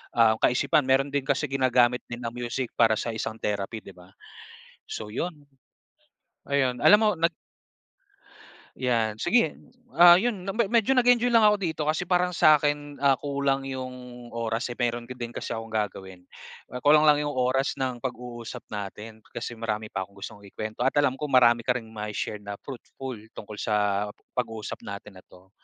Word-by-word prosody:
ah, 115 -2 +5
kaisipan 140 +3 +3
mayro'n 135 +1 +2
din 140 -1 0
kasi 145 +1 +1
ginagamit 125 -2 +2
din 120 0 -7
ang 115 - -3
music 120 +1 -3
para 115 -2 +5
sa 115 - -2
isang 110 0 -3
therapy, 105 +1 -3
'di - - -11
ba? 90 +1 -17 0.8
So 105 -1 -6
'yon. 150 -1 -4 1.0
Ayun, 135 -3 +1
alam 210 - +8
mo 215 - +4
nag 170 +1 +2 1.5
Yan, 115 -4 0
sige, 230 - +2 0.4
ah, 175 0 +10
'yon 200 -1 0
na 195 - -3
me 225 -3 +1
medyo 235 +2 +3
nag-enjoy 245 -1 +4
lang 230 -1 +6
ako 210 -1 +6
dito 160 -5 -2
kasi 160 +3 -2
parang 180 0 +2
sa 155 -3 +6
'kin, 145 -1 -2
ah, 135 -2 +4
kulang 140 0 -1
'yong 125 -2 -7
oras, 115 +1 -2
eh, 120 - -7
mayro'n 120 -1 -1
ga 125 - -6
din 120 -1 -6
kasi - - -5
akong 115 -1 -5
gagawin. 95 -3 -4 0.5
Ah, 125 - -5
kulang 150 +4 +5
lang 150 -1 +5
'yong 145 -1 -2
oras 130 +2 +1
ng 130 -3 -3
pag-uusap 120 -1 -6
natin 105 +2 -7 0.2
kasi 120 -1 -5
marami 110 -1 -3
pa 95 -1 -3
akong 100 - -25
gustong 100 +1 -9
ikuwento 110 +5 -4
at - - +1
alam 135 -2 +1
ko 150 - -2
marami 120 -4 +4
ka 125 - +3
ring 115 -3 -6
mai-share 105 -1 -4
na 100 0 -7
fruitful 130 -1 -8 0.2
tungkol 105 0 -9
sa 105 -1 0 0.3
pag-uusap 115 -3 -3
natin 100 -1 -8
na - - -15
'to. 95 +1 -19
125 Hz, 180 wpm, -26 LUFS, 110-145 Hz, 1.5 s, ah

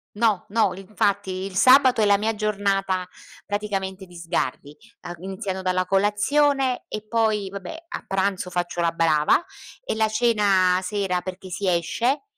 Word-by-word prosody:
No, 215 -4 +1
no 215 -3 +2
l 190 - -10
infatti 200 0 -1
il 195 -1 -7
sabato 255 +2 +6
è - - +4
la 200 0 +5
mia 220 +2 -1
giornata 195 -3 -1 0.4
praticamente 195 -2 -3
di 175 - -16
sgarri, 165 -3 -3 0.3
ehm, 175 - -7
iniziano 190 0 -5
dalla 185 0 0
colazione 255 +8 +1
e 215 0 -6
poi 215 -4 0
vabbè 200 - -8
a - - -6
pranzo 195 -1 -1
faccio 175 -1 -2
la 170 -1 +2
brava 165 - +2 0.4
e - - -2
la 220 0 +2
cena 205 -5 +3
sera 190 -2 -1
perché 185 +1 -8
si 190 +2 -3
esce 230 - 0
195 Hz, 155 wpm, -23 LUFS, 185-215 Hz, 0.4 s, sabato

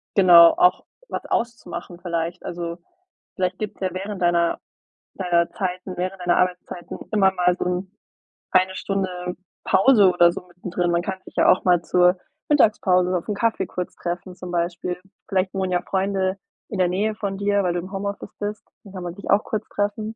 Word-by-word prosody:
genau, 175 -3 +8
auch 180 - +3 0.2
was - - -4
auszumachen 180 -7 -4
vielleicht. 170 0 -3
Also, 170 -1 -4 0.6
vielleicht 185 -1 -1
gibt's 215 -2 -5
ja 190 - 0
während 195 +1 -5
deiner 170 -1 +2 0.6
deiner 175 -2 +1
Zeiten 185 0 -4
während 185 +1 -3
deiner 175 -1 +2
Arbeitszeiten 180 -1 -2
immer 195 -3 +4
mal 180 -1 +2
so - - -3
'n 180 +1 -2 0.6
eine 185 0 +3
Stunde 185 -2 -3 0.3
Pause 200 -1 +5
oder 170 0 +5
so - - -6
mittendrin. 175 0 -2
Man 170 0 +2
kann 190 0 -4
sich - - -14
ja - - +4
auch - - +4
mal 180 -2 +4
zur 180 +1 +3 0.3
Mittagspause 185 -10 +3
auf 170 - -7
'n 210 - 0
Kaffee 230 +2 0
kurz 180 -1 -5
treffen 180 +1 -5
zum 180 -1 -8
Beispiel. 175 +1 -2 0.3
Vielleicht 190 -2 0
wohnen 190 -1 -1
ja 175 -1 +1
Freunde 190 0 -1 0.3
in 205 - -4
der 180 - +4
Nähe 205 +4 0
von 200 -3 -3
dir, 205 0 +1
weil 180 -2 +1
du 175 - -1
im 185 +2 -8
Homeoffice 200 +1 -5
bist. 210 0 -4 0.2
Dann 195 - -14
kann 185 -2 -6
man 175 -1 -5
dich 200 - -9
auch 205 +2 +4
kurz 215 0 -4
treffen. 215 +2 -2
185 Hz, 185 wpm, -23 LUFS, 175-195 Hz, 0.6 s, genau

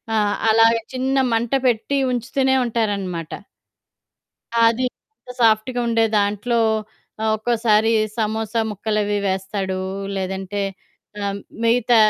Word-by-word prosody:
ఆహ్, 205 -1 +2
అలాగ 225 +1 +6 0.2
చిన్న 265 +1 0 0.2
మంట 230 +2 0
పెట్టి 245 +3 +1
ఉంచుతూనే 260 +2 +1
ఉంటారనమాట. 200 -8 -2 1.3
అది. 230 +2 +3 0.3
ఇంక 250 - -11
సాఫ్ట్‌గుండే 230 +1 +2
దాంట్లో 205 +4 0 0.6
ఆహ్, 220 - +2
ఒక్కోసారి 225 -1 +2 0.3
సమోసా 220 0 -1
ముక్కలవి 210 0 -1
వేస్తాడు. 190 0 -2 0.4
లేదంటే 190 +1 -3 0.6
ఆహ్, 200 0 -2 0.2
మిగతా 235 +1 +3
220 Hz, 95 wpm, -21 LUFS, 205-235 Hz, 1.3 s, అలాగ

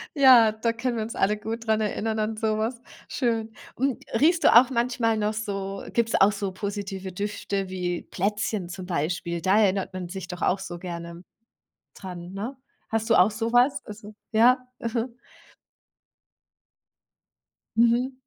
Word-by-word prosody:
Ja, 255 -6 +7
da 225 +2 -1
können 240 +1 -2
wir 220 - -1
uns 225 - -6
alle 210 +2 +1
gut 225 +2 -6
dran 220 0 +2
erinnern 220 +1 -1
an 215 0 -1
so 215 -1 0
was. 230 +2 -2 0.3
Schön. 225 -4 -1 0.2
Und, 265 0 -1
riechst 325 +8 +3
du - - +6
auch 245 +2 +8
manchmal 235 -2 0
noch 210 0 0
so 195 -2 -4
gibt 235 -1 +1
es - - +1
auch 195 +2 +7
so 200 -1 -3
positive 195 -1 -5
Düfte 200 0 -3
wie 180 -2 -3
Plätzchen 205 -1 -2
zum 180 +1 -7
Beispiel? 170 0 -2
Da 190 +5 +3
erinnert 195 -3 +1
man 185 -2 -5
sich 190 0 -6
doch 180 -1 -7
auch 190 - +2
so 175 -2 -7
gerne 170 -1 -7 0.7
dran, 180 -1 -8
ne? 220 +8 -5 0.3
Hast 225 0 -1
du - - +6
auch 180 +4 +6
so 225 +2 -3
was? 245 +3 +3
Also 210 0 -10 0.2
ja. 240 +4 +5 0.2
Mhm. 230 +1 -3 2.6
Mhm. 235 +3 +3
215 Hz, 160 wpm, -25 LUFS, 190-230 Hz, 2.6 s, auch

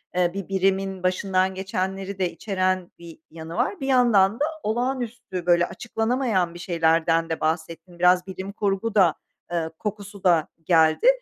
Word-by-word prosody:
eee, 175 -1 +2
bir 195 -1 -5
birimin 195 -1 0
başından 185 0 +1
geçenleri 190 +1 -3
de 180 -2 0
içeren 185 -1 -1
bir 170 -1 -12
yanı 160 0 -8
var. 265 - -1
Bir 270 - -4
yandan 230 -5 +4
da 295 - +2 0.2
olağanüstü, 240 -4 -3
böyle, 175 0 +4
açıklanamayan 225 -6 -1
bir 175 - -10
şeylerden 165 -1 +1
de 160 - -2
bahsettin, 165 +2 -3
biraz 180 +1 +4
bilim 190 +1 -6
kurgu 205 +2 -2
da, 180 -6 +5 0.4
eee, 165 -2 -1
kokusu 205 -2 -6
da 170 -4 +3 0.2
geldi. 160 - +3
190 Hz, 150 wpm, -24 LUFS, 175-210 Hz, 0.4 s, da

